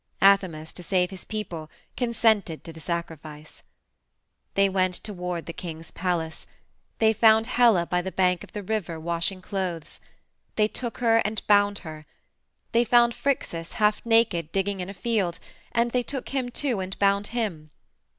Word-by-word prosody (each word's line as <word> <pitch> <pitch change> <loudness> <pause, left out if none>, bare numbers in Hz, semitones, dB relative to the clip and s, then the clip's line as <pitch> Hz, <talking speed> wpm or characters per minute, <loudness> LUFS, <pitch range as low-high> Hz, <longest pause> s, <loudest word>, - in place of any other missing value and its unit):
Athamas, 185 -6 +3
to - - -8
save 180 0 +1
his 190 - -9
people, 175 -8 -5 0.3
consented 220 -8 +1
to 165 - -9
the 160 - -11
sacrifice. 155 -2 -6 0.9
"They 195 0 +5
went 185 -1 +1
toward 180 -4 -4
the 170 - -6
king's 165 -2 -7
palace. 165 -3 -2 0.5
They 220 0 +4
found 220 0 +5
Helle 230 -7 +4
by 180 0 0
the 190 +1 -5
bank 180 -2 +1
of - - -14
the 210 - -5
river 185 -5 -2
washing 170 +3 -1
clothes. 180 -5 -4 0.6
They 210 -1 +3
took 235 +1 -5
her 230 -2 +4
and 215 -1 -1
bound 205 0 +4
her. 155 -1 -9 0.6
They 235 +1 +4
found 235 0 +4
Phrixus, 170 -13 -2
half 210 -2 +2
naked, 225 -9 +2
digging 195 0 -1
in 180 +1 -4
a 200 - -8
field, 195 -4 0 0.3
and 235 0 +1
they 250 - +2
took 265 +1 -5
him, 260 -3 -1
too, 245 -3 -1
and 190 0 -5
bound 200 0 +2
him. 200 -10 -3
195 Hz, 160 wpm, -26 LUFS, 170-220 Hz, 0.9 s, They